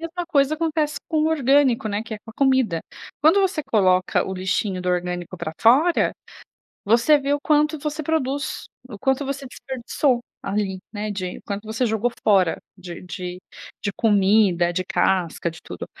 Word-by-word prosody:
mesma 350 +1 -5
coisa 285 -3 +2
acontece 310 -2 -1
com 315 - 0
o - - +2
orgânico, 275 -6 +3
né? 205 +1 -2
Que 225 -1 -7
é - - -8
com 225 - -13
a - - -14
comida. 260 -11 +2 0.4
Quando 320 +7 +5
você 380 -5 0
coloca 185 -8 +2
o 190 - -4
lixinho 185 +1 -1
do 180 - -3
orgânico 180 0 -2
pra 170 -3 -5
fora, 285 +10 +4 0.7
você 235 +8 +4
vê 280 0 -1
o 290 - -3
quanto 300 +1 +2
você 300 +2 -4
produz, 285 -3 -2 0.2
o 210 -5 -9
quanto 265 +4 0
você 275 0 -4
desperdiçou 255 0 -1 0.2
ali, 195 -1 -2
né. 210 0 -4
De 185 -3 -4
quanto 205 +1 -5
você 220 +3 -1
jogou 220 +1 0
fora 190 -5 +3 0.2
de 175 -3 -9
de 180 0 -6 0.4
de 200 - -1
comida, 195 -4 +3
de 185 - -1
casca, 175 -2 0
de 160 - -12
tudo. - - -7
225 Hz, 175 wpm, -22 LUFS, 190-285 Hz, 0.7 s, Quando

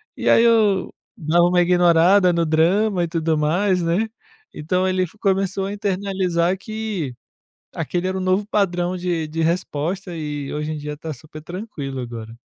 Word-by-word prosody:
E - - -1
aí 230 - +6
eu 215 -5 +3 0.2
dava 170 0 +2
uma 180 0 +3
ignorada 175 +1 +4
no 170 -1 +1
drama 175 +5 +2
e - - -1
tudo 165 -1 0
mais, 180 +5 +1
né. 175 +7 +1 0.5
Então 180 +5 -1
ele 185 0 +1
f 180 +4 -8
começou 195 -1 0
a 200 - -4
internalizar 190 -3 0
que 210 - -4 0.6
aquele 180 +1 -2
era 190 0 -2
o - - -3
novo 185 +2 +1
padrão 180 -3 0
de 175 -3 -2
de 160 +2 -3
resposta, 170 +2 -2
e 150 -3 -4
hoje 150 +1 -3
em - - -5
dia 150 0 -5
está 155 +1 -6
super 155 +4 -12
tranquilo, 160 - -6
agora. 115 -2 -7
175 Hz, 170 wpm, -21 LUFS, 160-195 Hz, 0.6 s, aí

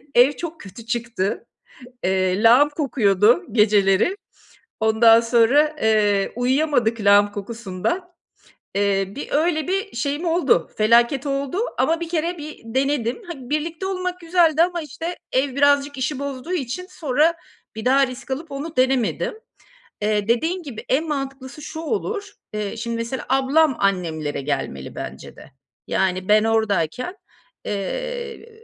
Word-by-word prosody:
ev 245 +4 +7
çok 330 +4 -7
kötü 220 +4 -11
çıktı. 230 -3 -2 0.6
Eee, 185 +2 +1
lağım 250 +6 +6
kokuyordu 240 - +2
geceleri. 210 - +3 0.6
Ondan 225 +1 +6
sonra, 245 +7 +3
eee, 210 -3 +2
uyuyamadık 245 -3 +1
lağım 205 0 +5
kokusundan. 230 - -4 0.6
Eee, 195 -1 +1
bir 285 - -6
öyle 315 +1 +1
bir 390 +3 -2
şeyim 285 +7 -2
oldu, 325 - +2
felaket 235 +5 +3
oldu 280 +5 -2 0.2
ama 330 +1 +2
1 335 -1 -5 0.3
bir 305 0 -9
denedim. 265 - -1
Hani, 270 -8 -8
birlikte 320 +4 -2
olmak 365 -1 -3
güzeldi 330 -2 +3
ama, 350 -1 -1
işte, 325 +4 -6
ev 260 0 0
birazcık 285 0 +3
işi 265 +1 -2
bozduğu 280 +4 -5
için 350 +3 -3
sonra 305 +3 +1 0.4
bir 220 - -6
daha 270 +2 +4
risk 255 +1 -9
alıp 310 +5 -4
onu 290 +4 -6
denemedim. 255 -2 +1 0.7
Eee, 210 -1 0
dediğin 325 +11 0
gibi, 260 -8 -8
en 310 +5 +1
mantıklısı 275 -1 -5
şu 315 +1 -7
olur, 405 +4 -3 0.2
eee, 210 0 -3
şimdi, 235 +1 -3
mesela 230 +3 -4
ablam 270 +2 +3
annemlere 165 -7 -1
gelmeli 135 - -4
bence - - -8
de. - - -15 0.4
Yani, 185 -1 0
ben 215 +1 +5
oradayken, 220 - 0 0.5
eee, 470 - -4
260 Hz, 130 wpm, -22 LUFS, 215-310 Hz, 0.7 s, ev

